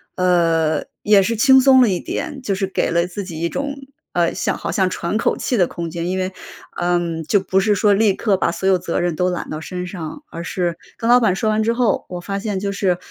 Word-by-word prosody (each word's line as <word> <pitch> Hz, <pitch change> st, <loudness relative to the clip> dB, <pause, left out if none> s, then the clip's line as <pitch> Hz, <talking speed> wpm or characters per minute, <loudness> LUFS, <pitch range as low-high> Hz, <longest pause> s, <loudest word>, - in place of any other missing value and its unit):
呃， 165 Hz, -4 st, +2 dB, 0.2 s
也 205 Hz, -2 st, +5 dB
是 230 Hz, +5 st, -1 dB
轻 265 Hz, +2 st, +6 dB
松 260 Hz, -1 st, +6 dB
了 240 Hz, -, +5 dB
一 185 Hz, -2 st, 0 dB
点， 285 Hz, -3 st, -5 dB
就 210 Hz, -6 st, -1 dB
是 195 Hz, 0 st, -1 dB
给 190 Hz, -, -1 dB
了 170 Hz, +1 st, +1 dB
自 190 Hz, +3 st, -6 dB
己 170 Hz, -4 st, -7 dB
一 170 Hz, -, 0 dB
种， 280 Hz, +5 st, -3 dB, 0.4 s
呃， 170 Hz, -1 st, +1 dB
像 -, -, -1 dB
好 -, -, -4 dB
像 190 Hz, -2 st, +1 dB
喘 175 Hz, +3 st, -2 dB
口 -, -, 0 dB
气 250 Hz, -, -1 dB
的 180 Hz, -4 st, +3 dB
空 170 Hz, -1 st, -5 dB
间。 170 Hz, +1 st, -4 dB
因 185 Hz, -, -1 dB
为， 185 Hz, 0 st, -2 dB, 0.5 s
嗯， 175 Hz, -2 st, 0 dB
就 200 Hz, +6 st, +2 dB
不 190 Hz, 0 st, +1 dB
是 210 Hz, +1 st, +2 dB
说 205 Hz, +1 st, +3 dB
立 205 Hz, 0 st, +3 dB
刻 210 Hz, -4 st, +1 dB
把 -, -, +1 dB
所 175 Hz, +3 st, -3 dB
有 190 Hz, -1 st, +4 dB
责 170 Hz, -, -2 dB
任 175 Hz, -2 st, -1 dB
都 180 Hz, +3 st, +1 dB
揽 180 Hz, -, -4 dB
到 155 Hz, -, -5 dB
身 180 Hz, +2 st, -5 dB
上， 180 Hz, -, -7 dB
而 170 Hz, -, -6 dB
是 175 Hz, -1 st, -2 dB, 0.2 s
跟 230 Hz, -, -2 dB
老 245 Hz, +1 st, +7 dB
板 200 Hz, -5 st, +2 dB
说 215 Hz, +3 st, 0 dB
完 215 Hz, 0 st, +1 dB
之 225 Hz, -, +2 dB
后， 235 Hz, -3 st, +1 dB
我 180 Hz, -, -5 dB
发 195 Hz, +3 st, -4 dB
现 205 Hz, -1 st, -3 dB
就 200 Hz, +1 st, -2 dB
是， 195 Hz, -3 st, 0 dB
185 Hz, 270 characters per minute, -20 LUFS, 175-210 Hz, 0.5 s, 老